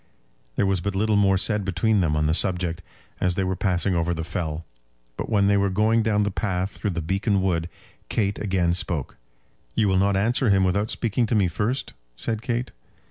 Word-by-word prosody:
There - - +2
was 95 -2 +1
but 100 +2 -3
little 105 +2 +2
more 100 -2 +4
said 105 +2 +1
between 100 +3 +1
them 80 -5 +1
on 75 - +1
the 80 - +2
subject 90 -2 0 0.4
as 90 -1 +1
they 95 - 0
were 95 0 -1
passing 95 0 0
over 85 0 0
the 80 - -3
fell, 80 -1 -4 0.5
but - - -5
when 100 -3 +3
they 100 0 +4
were 100 0 +2
going 110 +4 +2
down 105 -1 +2
the 105 - -1
path 95 -1 -2
through 105 - -3
the 85 -3 -3
Beacon 100 +4 +1
Wood, 85 -3 0 0.4
Kate 100 -2 0
again 95 -4 +1
spoke: 85 -5 -2 0.6
"You 105 - +2
will 95 -1 +3
not 100 0 +2
answer 115 +4 +2
him 95 -1 +4
without 100 +4 +1
speaking 115 0 0
to 115 - 0
me 100 -4 +3
first?" 105 +10 -2 0.2
said 110 - -3
Kate. 120 +1 -2
95 Hz, 205 wpm, -24 LUFS, 90-105 Hz, 0.6 s, more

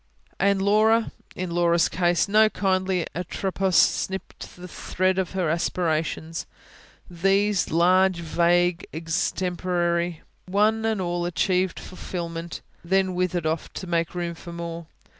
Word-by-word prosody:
And 195 0 +2
Laura?... 220 +3 +3 0.2
In 180 -1 -4
Laura's 170 -1 +3
case, 175 -1 +1
no 215 +2 +5
kindly 190 -3 0
Atropos 190 +1 -2
snipped 190 0 0
the 180 0 -10
thread 185 +1 -1
of 190 -1 -2
her 185 -3 0
aspirations: 165 0 -1 0.6
these, 195 +2 +1
large, 185 +3 +4
vague, 175 +1 +1
extemporary, 175 +1 -1 0.3
one 215 +4 +2
and 220 -3 0
all 175 -1 -2
achieved 180 +1 0
fulfilment; 170 -2 -6 0.2
then 190 +1 +1
withered 180 -2 -1
off 160 0 -2
to - - -6
make 170 -1 -1
room 175 -1 -2
for 170 +1 -10
more. 170 -1 -6
180 Hz, 120 wpm, -24 LUFS, 170-190 Hz, 0.6 s, no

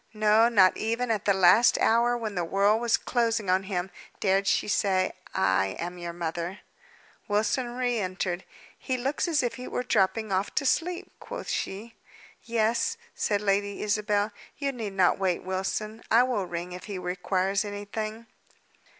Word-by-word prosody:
No; 215 +2 +4
not 195 -5 +5
even 230 +2 -1
at 215 -2 -1
the 200 - +4
last 190 +6 +6
hour 235 +2 +3
when 220 -3 -4
the 175 -2 -1
world 200 +6 +2
was 235 -1 +3
closing 230 -5 0
on 185 +1 +3
him, 190 -1 -3 0.3
dared 195 0 +2
she - - +2
say, 190 -2 +1 0.2
I 95 0 +2
am 175 +1 -5
your 170 0 -5
mother. 170 +2 -4 0.7
Wilson 220 +4 0
re 245 -2 0
entered. 185 -2 -2 0.4
"He 260 -2 -2
looks 275 +7 -1
as 320 -5 +2
if 245 - -2
he 250 - -7
were 250 - -2
dropping 220 -1 +1
off 190 +2 -1
to 280 - +1
sleep," 350 +6 0
quoth - - -7
she. 215 +4 -4 0.5
"Yes," 235 - 0 0.2
said 205 -1 0
Lady 200 0 0
Isabel. 210 0 0 0.3
"You 280 -1 -1
need 225 -6 -5
not 185 -1 +3
wait, 185 -3 0
Wilson. 195 +4 -3
I 235 +2 +6
will 230 -7 -1
ring 175 +1 -5
if 180 0 -8
he 200 -2 -5
requires 185 +2 -1
anything." 215 +2 -5
205 Hz, 165 wpm, -27 LUFS, 185-230 Hz, 0.7 s, last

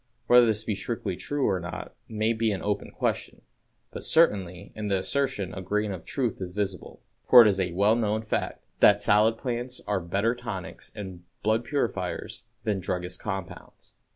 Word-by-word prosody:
Whether 120 -1 +7
this 110 -1 0
be 110 - -1
strictly 100 -2 -3
true 145 +8 -1
or 95 - +1
not 85 -1 -7 0.2
may 110 +1 +1
be 110 -1 +1
an 95 - -3
open 105 0 -1
question, - - -3 0.5
but - - -7
certainly 95 - +2
in 105 -1 -4
the 100 -1 +2
assertion 115 -2 -1
a 95 - -5
grain 105 +3 -1
of 95 -3 -7
truth 125 -7 -2
is 90 -1 -5
visible; 100 -2 -4 0.3
for 125 -2 +11
it - - +5
is 100 -2 +2
a 90 -2 -1
well 100 +5 +4
known 110 -1 0
fact 110 - -2 0.2
that 105 0 +7
"salad 105 +2 +4
plants 125 0 -3
are 105 -2 0
better 100 +6 0
tonics 120 -7 -7
and 95 -4 -7 0.2
blood 110 +2 +2
purifiers 115 -7 -2 0.2
than 105 -3 0
druggists' 90 0 -3
compounds." 95 -4 -7
105 Hz, 180 wpm, -27 LUFS, 95-115 Hz, 0.5 s, for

